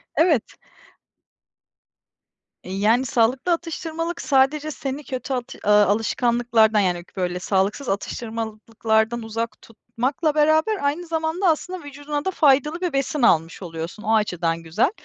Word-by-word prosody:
Evet. 320 -8 +2 2.1
Eee, 185 - -7
yani, 225 +6 +3
sağlıklı 250 +7 +1
atıştırmalık 330 0 -3
sadece 290 +2 +2
seni 275 0 -5
kötü 260 0 -4
at 250 -2 -4
eee, 210 - -1
alışkanlıklardan, 220 +1 +3
yani, 180 -3 0
böyle, 180 -1 -1
sağlıksız 200 +8 0
atıştırmalıklardan 220 +1 -2
uzak 225 0 -4
tutmakla 270 +7 -2
beraber, 315 +8 +3
aynı 320 +5 -1
zamanda 325 +3 -1
aslında 355 +3 -1
vücuduna 290 +1 -5
da 380 - 0
faydalı 300 +2 +3
bir 355 -5 -1
besin 275 +2 -1
almış 165 -5 +2
oluyorsun. 170 +4 -7
O 225 0 +2
açıdan 170 -6 0
güzel. 190 - +1
245 Hz, 125 wpm, -23 LUFS, 215-305 Hz, 2.1 s, yani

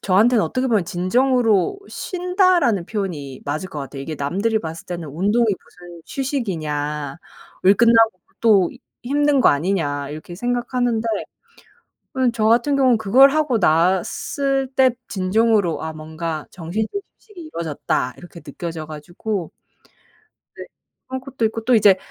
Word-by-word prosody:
저한테는 215 +5 +3
어떻게 255 +11 -1
보면 220 -7 +2
'진정으로 225 - +2
쉰다.'라는 360 - +1
표현이 155 - -5
맞을 155 +6 -3
것 170 - -7
같아요. 140 0 -7
이게 155 +3 -5
남들이 200 +11 0
봤을 165 -4 -7
때는 170 -3 -5
"운동이 200 +11 +1
무슨 175 -4 -6
휴식이냐. 155 - -3 0.5
일 195 +2 +7
끝나고 225 -3 +4 0.2
또 205 -6 +4 0.3
힘든 290 +2 +2
거 - - +7
아니냐." 145 -3 -1
이렇게 155 +4 -8
생각하는데 245 +1 -1 1.1
어 260 -2 +2
저 220 -2 0
같은 240 +6 +3
경우는 260 -4 +4
그걸 245 +6 +6
하고 295 -5 +1
났을 265 - +1
때 260 -1 +5 0.2
진정으로 200 -1 +1
'아 160 - -4
뭔가 155 0 -5
정신적인 210 - -3 0.2
휴식이 420 -5 -14
이루어졌다.' 160 - -3
이렇게 175 -1 -12
느껴져 165 -2 -6
가지고 175 +5 -5 1.0
네 - - -7 0.4
그런 260 0 -4
것도 260 -3 -3
있고 220 0 -4
또 250 +2 +3
이제 205 -4 +6
205 Hz, 310 characters per minute, -21 LUFS, 165-245 Hz, 1.1 s, 일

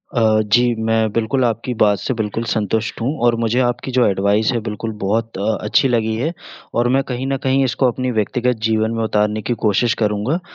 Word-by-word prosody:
अ, 110 -2 +3
जी, 120 0 +4
मैं 110 -1 0
बिल्कुल 115 +3 0
आपकी 115 +2 -2
बात 105 -1 +4
से - - -2
बिल्कुल 110 0 -3
संतुष्ट 110 +2 -2
हूँ 130 +6 0
और 120 -1 +4
मुझे 115 +2 +1
आपकी 120 +2 -3
जो 125 - +5
एडवाइस 100 +3 +1
है, 120 - 0
बिल्कुल, 110 +1 -4
बहुत 110 +1 -1
अ, 105 +2 0
अच्छी 105 +5 +3
लगी 110 -2 0
है 150 +10 -2 0.4
और 120 +1 +1
मैं 135 - +2
कहीं 125 +2 -3
न 135 0 0
कहीं 135 +1 +2
इसको 130 +1 +1
अपनी 130 +1 -1
व्यक्तिगत 120 +3 0
जीवन 110 0 +1
में 115 - -1
उतारने 105 0 0
की 120 - -1
कोशिश 110 +3 +2
करूँगा 105 - 0
115 Hz, 205 wpm, -19 LUFS, 110-125 Hz, 0.4 s, जो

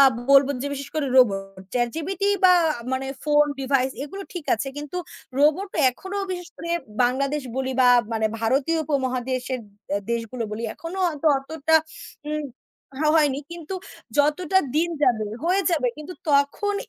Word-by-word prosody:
আ - - +10 0.3
বলব 275 0 +7
যে, - - -2
বিশেষ 280 0 -6
করে 305 -3 0
রোবট, 195 -6 +3
চ্যাট 240 -1 +1
জিপিটি 380 +5 -1 0.2
বা 365 -1 +8 0.4
মানে 265 +1 -1 0.2
ফোন, 295 0 +5 0.2
ডিভাইস 265 -1 +1
এগুলো 390 +6 -7
ঠিক 345 - -5
আছে, 270 +5 -4
কিন্তু 295 +4 -6 0.4
রোবটো 315 +8 +2
এখনও 380 +9 -5
বিশেষ 355 -1 -5
করে 335 +1 -6 0.3
বাংলাদেশ 275 +4 +1
বলি 265 0 -1
বা 250 - +6 0.2
মানে 220 -1 +1
ভারতীয় 270 +8 +1
উপমহাদেশের 255 -2 -1 0.5
দেশগুলো 235 +1 -2
বলি, 215 +2 -4
এখনও 345 +3 -6
হয়তো 315 -1 -2
অতটা 315 +3 -1 0.6
উম 305 0 -2 0.7
হয়নি। 290 -4 +3
কিন্তু 340 +1 -6 0.4
যত 295 +1 +4 0.4
দিন 340 +2 +2
যাবে, 220 -6 +3 0.2
হয়ে 375 +3 +2
যাবে। 290 -7 +2
কিন্তু 305 +4 -8 0.2
তখন 285 +9 +2
285 Hz, 145 wpm, -24 LUFS, 255-330 Hz, 0.7 s, আ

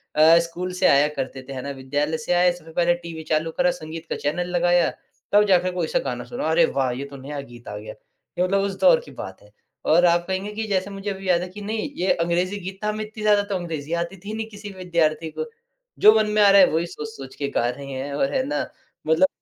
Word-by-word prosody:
अ, 160 +2 +7
school 175 +2 -4
से - - +1
आया 140 +2 +5
करते 130 0 -4
थे - - -5
है 130 - -5
ना, 140 - -5
विद्यालय 145 +4 -2
से 155 +3 -1
आए, 175 0 +4
सबसे 165 -2 -13
पहले 175 0 +3
टीवी 165 -1 -7
चालू 160 +1 0
करा, 265 0 +4
संगीत 165 -8 -8
का - - -1
चैनल 175 +5 -2
लगाया, 175 0 +3 0.4
तब 205 0 +6
जाके 185 -1 +3
कोई-सा 465 - 0
गाना - - -4
सुना। 485 - -3
अरे - - +5
वाह! 130 - 0
ये 130 +3 -4
तो 140 0 -10
नया 140 +2 -6
गीत 120 0 -14
आ 105 - -6
गया, 105 - -8 0.5
ये - - +4
मतलब 195 +2 +2
उस 195 -1 -2
दौर 180 -4 +6
की 145 - -12
बात 95 -7 -8
है। 105 - -20 0.4
और 175 +3 +6
आप 170 0 +3
कहेंगे 190 +2 -2
कि 220 - -2
जैसे 195 -1 0
मुझे 195 +1 -5
अभी 195 0 -7
याद 175 -1 +4
है 180 - -4
कि 205 - -7
नहीं 220 +6 -3
ये 185 +2 +2
अंग्रेजी 175 +4 0
गीत 190 0 -7
था 210 - +1
हमें 215 0 -2
इतनी 215 0 -9
ज़्यादा 210 -1 +5
तो 195 - -1
अंग्रेजी 165 -4 -4
आती 175 +3 -9
थी 210 - -4
नहीं 220 0 -3
किसी 205 0 -9
विद्यार्थी 165 -4 0
को, - - -4 0.5
जो 215 +1 +8
मन 215 -1 +2
में 215 - +4
आ 205 - +7
रहा 200 0 +8
है 185 - +7
वही 165 +2 +1
सोच-सोच 150 -4 -8
के 140 - -2
गा 120 - +2
रहे 140 +3 -6
हैं 135 +2 -4
और 140 0 0
है 260 - +1
ना 295 - -1 0.5
मतलब 160 +4 +5
175 Hz, 255 wpm, -23 LUFS, 150-195 Hz, 0.5 s, जो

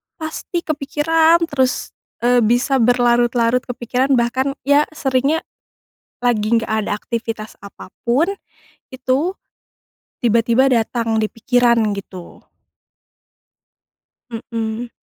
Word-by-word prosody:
pasti 335 +1 -5
kepikiran 320 +3 +2
terus, 260 -3 0 0.3
eee, 245 0 +4
bisa 245 +4 +2
berlarut-larut 240 0 +2
kepikiran 250 +2 0
bahkan 260 +3 0
ya 285 +2 +3
seringnya 275 +3 0 0.8
lagi 230 -2 +1
gak - - -6 0.2
ada - - -1
aktivitas 220 -1 -5
apa 200 -1 -12 0.2
pun 290 +11 +2 0.6
itu, 260 +6 0 0.9
tiba-tiba 235 +3 +3
datang 225 -1 0
di 215 - 0
pikiran 240 +1 +2 0.2
gitu. 190 -3 -9 2.1
Mmm. 225 +1 -3
245 Hz, 90 wpm, -19 LUFS, 230-275 Hz, 2.1 s, eee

